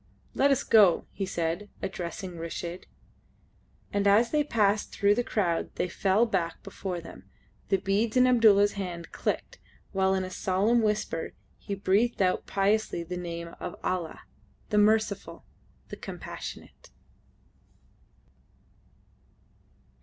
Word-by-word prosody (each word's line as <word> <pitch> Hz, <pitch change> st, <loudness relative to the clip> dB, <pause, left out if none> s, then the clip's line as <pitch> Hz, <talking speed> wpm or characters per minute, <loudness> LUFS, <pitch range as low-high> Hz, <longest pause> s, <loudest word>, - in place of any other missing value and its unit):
"Let 280 Hz, -, +3 dB
us 275 Hz, -, +2 dB
go," 205 Hz, -6 st, +5 dB
he 195 Hz, -1 st, -4 dB
said, 170 Hz, +5 st, -2 dB
addressing 180 Hz, -1 st, -5 dB
Reshid. 170 Hz, +1 st, -6 dB, 1.1 s
And 200 Hz, 0 st, +2 dB
as 220 Hz, +4 st, +4 dB
they 300 Hz, -1 st, +3 dB
passed 210 Hz, -6 st, +1 dB
through 205 Hz, 0 st, +3 dB
the 245 Hz, -, 0 dB
crowd 180 Hz, -8 st, -1 dB
that 180 Hz, -, -2 dB
fell 200 Hz, +5 st, +2 dB
back 185 Hz, -7 st, -2 dB
before 190 Hz, -2 st, -5 dB
them, 165 Hz, -, -12 dB, 0.4 s
the 195 Hz, -, +4 dB
beads 210 Hz, +5 st, 0 dB
in 255 Hz, -, +6 dB
Abdulla's 215 Hz, -5 st, +5 dB
hand 175 Hz, -4 st, -6 dB
clicked, -, -, -3 dB, 0.3 s
while 190 Hz, 0 st, +2 dB
in 190 Hz, -, 0 dB
a 185 Hz, -, -6 dB
solemn 200 Hz, +6 st, +2 dB
whisper 210 Hz, -6 st, -1 dB, 0.3 s
he 200 Hz, -, -4 dB
breathed 205 Hz, +5 st, +1 dB
out 185 Hz, -2 st, +1 dB
piously 200 Hz, -2 st, +1 dB
the 180 Hz, +2 st, -6 dB
name 170 Hz, -1 st, -5 dB
of -, -, -5 dB
Allah! 175 Hz, -3 st, -2 dB, 0.5 s
The 210 Hz, -, +3 dB
Merciful! 215 Hz, -1 st, +1 dB, 0.4 s
The -, -, -7 dB
Compassionate! -, -, -8 dB
195 Hz, 125 wpm, -28 LUFS, 180-215 Hz, 1.1 s, in